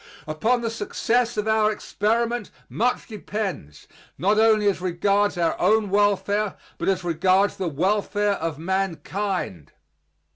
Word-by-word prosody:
Upon 220 +11 0
the 230 -1 -2
success 230 +2 0
of 210 +1 -1
our 220 -1 +3
experiment 230 +2 -1 0.2
much 245 +3 0
depends 195 - -5 0.3
not 205 +4 +2
only 220 -1 +4
as 195 -2 +1
regards 195 +3 +1
our 170 -1 +1
own 210 +1 +3
welfare, 205 0 +1 0.2
but - - 0
as 190 -1 0
regards 185 +4 +2
the 185 -3 -2
welfare 205 +5 0
of 165 -5 -3
mankind. 190 - -3
205 Hz, 125 wpm, -24 LUFS, 185-215 Hz, 0.3 s, only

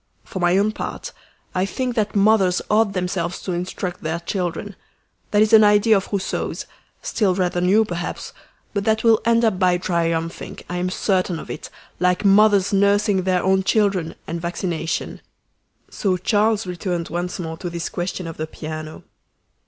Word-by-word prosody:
For 190 - -7
my 175 +1 +3
own 205 +2 +2
part, - - -6 0.4
I 185 - +1
think 250 +5 -2
that 215 -3 -1
mothers 200 -3 +4
ought 210 -1 +3
themselves 180 -1 -2
to 185 - -3
instruct 180 0 -4
their 160 +2 -2
children. 180 +2 -3 0.5
That 210 0 +4
is 215 +1 0
an 220 -1 +9
idea 210 +1 +5
of 195 - -1
Rousseau's, 200 -2 -2 0.4
still 195 -5 +1
rather 180 -1 0
new 200 +5 +4
perhaps, 175 -3 -5 0.4
but 200 -1 -1
that 220 0 +1
will 225 -2 +5
end 230 -4 +3
by 180 -2 +3
triumphing, 165 -2 -2
I 180 - -4
am 180 +1 -1
certain 185 -2 0
of - - -8
it, - - -7 0.3
like 180 +2 +1
mothers 200 -1 +5
nursing 200 -1 +3
their 185 -1 +1
own 190 0 +3
children 195 -4 +1
and 170 +1 -4
vaccination." 170 -1 -3 0.7
So 190 -4 0
Charles 210 +3 +1
returned 175 -1 -3
once 175 +2 -3
more 160 -2 -5
to 175 - -5
this 170 0 -4
question 180 +1 -4
of 165 -1 -7
the 155 - -3
piano. 155 0 -7
185 Hz, 165 wpm, -21 LUFS, 175-205 Hz, 0.7 s, an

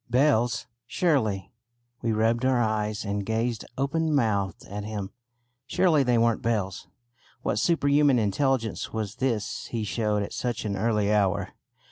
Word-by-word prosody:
Bells! 120 -3 +2 0.2
Surely 120 - 0 0.5
we 115 - 0
rubbed 115 +2 +1
our 130 -1 +3
eyes 110 -1 -1
and 100 0 -2
gazed 115 +2 -1
open 155 +3 0
mouthed 100 -7 0
at 100 +1 -6
him 105 -2 -5 0.6
surely 175 -1 +3
they 125 -3 +2
weren't 115 0 +2
bells! 105 -6 -2 0.6
What 105 - 0
superhuman 145 -3 +3
intelligence 115 +2 0
was 110 -2 -4
this 115 -3 -2
he 115 -2 -3
showed 105 -1 0
at - - -6
such 120 -2 -3
an 100 -2 -1
early 105 0 +1
hour. 100 -3 +1
115 Hz, 140 wpm, -26 LUFS, 105-130 Hz, 0.6 s, our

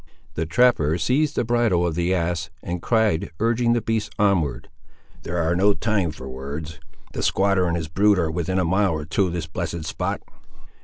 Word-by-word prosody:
The 80 +1 -2
trapper 80 -6 +3
seized 145 +8 +1
the - - +1
bridle 115 -7 +2
of 85 - 0
the 85 +2 0
ass, 85 -3 -1
and 85 0 -4
cried, 110 -7 +1
urging 115 +1 +2
the 120 -2 0
beast 110 -2 -1
onward— 95 -8 +1 0.5
"There 85 -1 -1
is - - -1
no 100 +3 +3
time 105 -6 0
for 70 -3 -8
words. 70 +5 -6 0.3
The - - -3
squatter 95 -2 +2
and 85 0 0
his 80 -2 -4
brood 100 +5 +3
are 80 -3 0
within 90 +3 -2
a 95 - +2
mile 95 +1 +2
or 75 -1 -4
two 95 +5 +1
of 85 - -4
this 85 -3 -3
blessed 85 0 -4
spot!" - - -2
90 Hz, 195 wpm, -23 LUFS, 80-105 Hz, 0.5 s, trapper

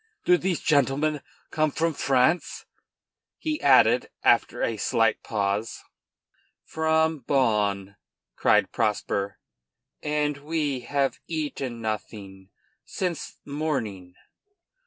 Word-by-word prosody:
Do 180 - +6
these 180 -1 -1
gentlemen 145 +1 +1 0.3
come 155 0 +1
from 165 +3 -1
France?" 140 +5 +1 0.7
he 310 -1 -3
added 125 -3 +5
after - - +3
a 115 - 0
slight 115 +1 +1
pause. 105 +1 -2 0.8
"From 160 0 +1
Bonn," 105 -7 0 0.4
cried - - +3
Prosper, 100 0 -1 0.6
"and 150 -1 -1
we 145 -2 -2
have 135 +2 -1
eaten 140 -7 -4
nothing 100 -3 -6 0.3
since 180 -5 -4
morning." 115 - -3
140 Hz, 95 wpm, -25 LUFS, 110-155 Hz, 0.8 s, Do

